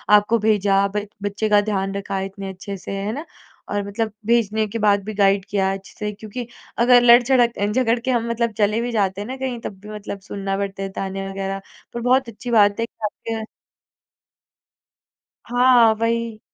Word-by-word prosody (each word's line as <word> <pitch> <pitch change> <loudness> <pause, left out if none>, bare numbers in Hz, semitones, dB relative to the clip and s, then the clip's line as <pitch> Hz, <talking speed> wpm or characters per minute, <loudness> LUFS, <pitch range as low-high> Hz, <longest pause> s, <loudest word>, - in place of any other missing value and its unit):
आपको 210 +3 +3
भेजा 200 -2 +3
ब 210 0 -1 0.2
बच्चे 205 +2 -1
का 205 0 +5
ध्यान 195 -2 -2
रखा 200 -1 -3
इतने 195 0 -6
अच्छे 195 +1 -7
से। 185 - -8
है 195 +2 -2
ना? 295 +6 -5 0.4
और 205 0 -1
मतलब 215 +1 -2
भेजने 220 -2 +2
के 230 +3 -4
बाद 205 -1 +3
भी 215 +2 -5
गाइड 195 -1 +3
किया 195 -1 +1
अच्छे 195 0 -9
से 210 0 -2
क्योंकि 220 +3 -7 0.3
अगर 245 +1 +6
लड़झड़क 240 0 +5
अ, 205 - +1
झगड़ 230 +2 +1
के 255 +2 -1
हम 235 -1 0
मतलब 235 0 0
चले 210 +2 +2
भी 240 0 -2
जाते 200 -3 0
हैं 205 - -6
ना 260 +1 -5
कहीं, 260 -2 -3
तब 190 -2 -7
भी 210 - -12
मतलब 210 -1 -6
सुनना 195 -1 -3
पड़ता 195 -1 -3
है 195 - -3
तानें 195 0 -4
वग़ैरह। 195 0 -4 0.3
पर 235 - -4
बहुत 250 0 +2
अच्छी 230 +3 -7
बात 205 -2 +4
है 230 - +1
कि - - -20
आपके 225 +1 -4 2.1
हाँ, 245 -2 +5
वही। 230 -1 -1
210 Hz, 190 wpm, -21 LUFS, 200-235 Hz, 2.1 s, अगर